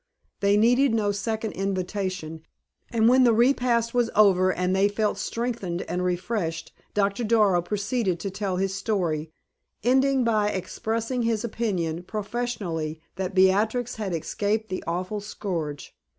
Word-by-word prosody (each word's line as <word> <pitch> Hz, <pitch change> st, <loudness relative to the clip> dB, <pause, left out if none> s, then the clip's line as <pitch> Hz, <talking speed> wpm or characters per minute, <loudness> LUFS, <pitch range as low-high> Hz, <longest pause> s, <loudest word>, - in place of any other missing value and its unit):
They 200 Hz, 0 st, +3 dB
needed 245 Hz, +3 st, +4 dB
no 210 Hz, -2 st, +1 dB
second 220 Hz, +2 st, -2 dB
invitation, 185 Hz, -4 st, -3 dB, 0.5 s
and 225 Hz, -1 st, +3 dB
when 255 Hz, +2 st, +6 dB
the 240 Hz, -2 st, +5 dB
repast 235 Hz, -1 st, +2 dB
was 240 Hz, -2 st, +2 dB
over 185 Hz, -3 st, +5 dB
and 180 Hz, +1 st, 0 dB
they 195 Hz, +1 st, +4 dB
felt 210 Hz, +1 st, -1 dB
strengthened 230 Hz, -7 st, -3 dB
and 180 Hz, 0 st, -3 dB
refreshed, 180 Hz, -2 st, -2 dB, 0.2 s
Doctor 200 Hz, +2 st, +1 dB
Darrow 210 Hz, -5 st, +3 dB
proceeded 200 Hz, 0 st, -1 dB
to 195 Hz, -, -3 dB
tell 195 Hz, -1 st, -2 dB
his 195 Hz, +1 st, -1 dB
story, 175 Hz, -7 st, -1 dB, 0.5 s
ending 265 Hz, +2 st, +3 dB
by 215 Hz, -3 st, +2 dB
expressing 225 Hz, +6 st, -2 dB
his 230 Hz, -2 st, 0 dB
opinion, 185 Hz, -8 st, -2 dB
professionally, 200 Hz, -6 st, -3 dB, 0.2 s
that 190 Hz, 0 st, -3 dB
Beatrix 215 Hz, +6 st, +2 dB
had 210 Hz, -4 st, -3 dB
escaped 205 Hz, +6 st, -1 dB
the 185 Hz, -, -4 dB
awful 185 Hz, +5 st, -2 dB
scourge. 170 Hz, -9 st, -5 dB
205 Hz, 135 wpm, -25 LUFS, 185-230 Hz, 0.5 s, when